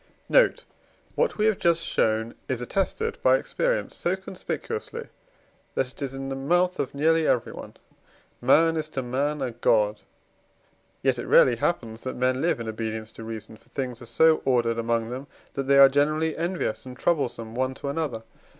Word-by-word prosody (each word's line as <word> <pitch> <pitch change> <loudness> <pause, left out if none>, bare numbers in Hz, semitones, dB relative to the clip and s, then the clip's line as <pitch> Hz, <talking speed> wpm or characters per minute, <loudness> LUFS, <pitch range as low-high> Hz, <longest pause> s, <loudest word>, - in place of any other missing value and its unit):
Note. - - +4 0.5
What 485 - 0
we 210 - +2
have 215 -3 +2
just 170 -1 +2
shown 110 +1 0 0.2
is 130 -3 -1
attested 195 - -2
by - - +5
experience - - -1
so 175 +2 0
conspicuously, 445 - -6 0.7
that 130 -1 0
it - - -17
is 135 -1 -3
in 135 0 -5
the 135 - -3
mouth 175 +7 +1
of 135 - -2
nearly 160 +2 +3
everyone: 120 - -1 0.7
"Man 160 +6 +4
is 155 -1 -3
to 135 -3 -3
man 140 +4 -1
a 125 - -2
God." 105 -2 +2 1.0
Yet - - +2
it - - -5
rarely 120 -2 +6
happens 115 -6 -2
that 130 - -5
men 130 +1 +1
live 170 -6 +1
in 115 - -5
obedience 110 0 -4
to 115 - -10
reason, 110 -1 -7
for - - -27
things 125 -4 -4
are 120 - -10
so 160 +7 +4
ordered 120 -3 +1
among 115 0 -1
them, 130 +3 -6 0.3
that 135 -1 -3
they 140 0 +5
are 140 0 +10
generally 155 +3 +1
envious 170 -8 -2
and 125 -1 -10
troublesome 120 -9 -1
one 130 +2 -1
to 140 - -7
another. 140 -6 -2
135 Hz, 175 wpm, -26 LUFS, 115-165 Hz, 1.0 s, are